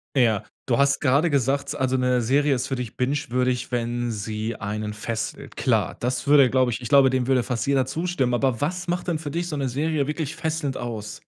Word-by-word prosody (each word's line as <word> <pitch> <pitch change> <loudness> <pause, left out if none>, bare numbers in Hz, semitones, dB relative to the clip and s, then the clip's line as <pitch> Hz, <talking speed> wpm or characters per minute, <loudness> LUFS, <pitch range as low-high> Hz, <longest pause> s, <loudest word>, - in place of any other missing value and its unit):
Ja, 110 -5 +3 0.2
du 120 - +1
hast 140 0 +3
grade 145 +5 +3
gesagt, 140 0 0
also, 130 0 0
'ne 125 -1 +2
Serie 140 +4 +2
ist 125 - -2
für 135 - -2
dich 125 -2 -6
bingewürdig, 125 -2 0
wenn 120 0 -1
sie 110 +2 -3
einen 105 0 -4
fesselt. 110 +1 -5
Klar. - - +1
Das 125 0 -2
würde, 140 -3 +6
glaub 130 -1 +2
ich 120 - -3
ich 120 - -5
glaube, 140 -2 +6
dem 130 -1 0
würde 130 -3 +3
fast 125 -1 -2
jeder 135 -2 +3
zustimmen. 160 -4 -1
Aber 120 -2 +1
was 175 +4 -2
macht 175 +1 -2
denn 165 -3 0
für 150 -2 -5
dich 170 +2 -2
so 155 - -4
'ne 135 -2 -1
Serie 145 +2 0
wirklich 150 -1 -3
fesselnd 155 -4 -2
aus? 110 -3 -6
130 Hz, 210 wpm, -24 LUFS, 120-145 Hz, 0.2 s, würde